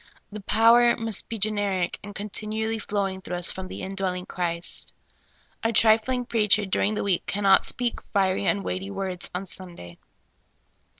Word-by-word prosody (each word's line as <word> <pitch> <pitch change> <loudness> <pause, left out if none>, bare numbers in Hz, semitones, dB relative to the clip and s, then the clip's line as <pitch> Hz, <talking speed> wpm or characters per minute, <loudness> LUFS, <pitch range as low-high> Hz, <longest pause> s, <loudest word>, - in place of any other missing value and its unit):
The 210 0 -7
power 230 +4 +5
must 225 -3 -3
be 230 - -4
generic, 200 -4 0
and 205 0 -9
continually 215 +2 -3
flowing 195 -2 -2
through 180 - -5
us 175 -1 -1
from 190 0 -7
the - - -7
indwelling 190 -2 -3
Christ. 170 -2 -3 0.7
A 225 - +1
trifling 225 +3 +3
preacher 210 -3 +3
during 200 +2 0
the - - -1
week 195 -4 0
cannot 195 -1 +4
speak 245 -2 -1
fiery 195 -1 +1
and 200 -1 +1
weighty 190 +1 -3
words 190 -2 -3
on 185 +2 -3
Sunday. 170 - -7
200 Hz, 155 wpm, -25 LUFS, 190-220 Hz, 0.7 s, power